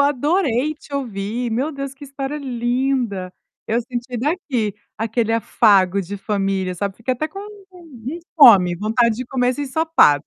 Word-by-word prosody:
adorei 290 0 +1
te 295 -1 -12
ouvir, 235 -2 -3
meu 260 +8 -1
Deus, 275 -1 -5
que 280 +1 -11
história 275 +1 -5
linda! 245 -6 -1 0.3
Eu 230 +2 +1
senti 245 +1 -5
daqui 260 - -1 0.2
aquele 225 +1 -1
afago 200 -4 +3
de 195 +2 -6
família, 195 -2 -1
sabe, 200 +2 -3
fiquei 230 +3 -2
até 255 +5 -2
com 390 +6 -9 0.3
com 355 -3 -16
com 295 +8 -4 0.2
fome, 195 - +7
vontade 220 +3 +1
de 255 - -4
comer 250 -1 0
esse 255 +3 -1
ensopado. 285 - +3
245 Hz, 160 wpm, -20 LUFS, 210-280 Hz, 0.3 s, fome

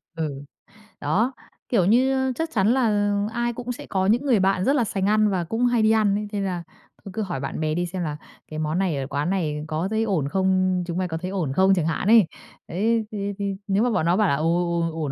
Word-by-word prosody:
Ừ, 145 -4 -4 0.6
đó, 235 +6 +1 0.4
kiểu 195 -8 +3
như, 250 +6 +4 0.2
ơ, - - 0
chắc 325 0 -2
chắn 200 -2 +2
là 210 -5 +2 0.2
ai 240 0 -1
cũng 245 +1 -5
sẽ - - -7
có 190 -1 -1
những 240 +8 +2
người 240 -7 +3
bạn 190 0 +2
rất 280 - +3
là 245 - +3
sành 195 -2 -2
ăn 215 0 +3
và 185 -3 0
cũng 225 +8 -1
hay 240 -2 +2
đi 215 0 +4
ăn 210 -3 +3
đấy, 210 0 -3
thế 205 - -2
là 180 -3 -2 0.4
thôi 195 - -7
cứ 220 - -2
hỏi 180 -9 -3
bạn 135 - -4
bè 155 -1 0
đi 175 +2 -1
xem 180 0 -4
là 150 -2 -3 0.3
cái 155 0 -6
món 155 +3 -1
này 175 -7 0
ở 135 0 -3
quán 145 +4 -2
này 155 -6 -1
có 160 +4 -2
thấy 220 0 0
ổn 175 -10 0
không, 185 0 +1
chúng 170 +1 -3
mày 185 -1 0
có 160 -1 -4
thấy 185 +3 -5
ổn 165 -9 -2
không 190 +3 +4
chẳng 175 -4 +1
hạn 165 +4 -1
ấy. 220 -4 +7 0.4
Đấy 220 +5 0
thì 200 -1 -3
thì 200 -1 -2
nếu 200 +3 +2
mà 245 - +2
bọn 190 -8 0
nó 175 +3 +3
bảo 210 -3 +3
là 140 - +2
"Ồ, 155 +3 -1 0.4
ổn, 165 0 -1
ổn, 155 -4 -3
190 Hz, 260 wpm, -24 LUFS, 165-220 Hz, 0.6 s, ấy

